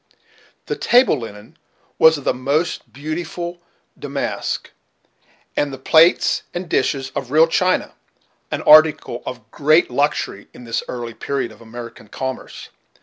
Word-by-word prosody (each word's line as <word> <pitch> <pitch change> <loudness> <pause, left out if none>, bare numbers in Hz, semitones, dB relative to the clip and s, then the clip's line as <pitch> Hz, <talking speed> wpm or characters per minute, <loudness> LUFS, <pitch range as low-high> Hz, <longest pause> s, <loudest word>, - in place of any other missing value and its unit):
The - - -3
table 245 - +3
linen 115 +6 -10 0.4
was 160 -1 +6
of 145 - -9
the - - +1
most 140 +6 -2
beautiful 170 +4 -5 0.4
damask, - - -3 0.8
and 145 -1 0
the 135 - -7
plates 160 +6 +4
and 175 +1 -4
dishes 135 -3 0
of 135 - -5
real 155 +4 +6
china, 185 +2 0 0.6
an - - -3
article 155 0 +5
of 115 -3 -8
great 155 +1 +3
luxury 140 -6 -1
at 125 - -12
this 115 - -2
early 120 -2 -5
period 135 +1 -3
of 110 - -17
American 115 -1 -10
commerce. 130 +4 -6
140 Hz, 135 wpm, -20 LUFS, 120-160 Hz, 0.8 s, was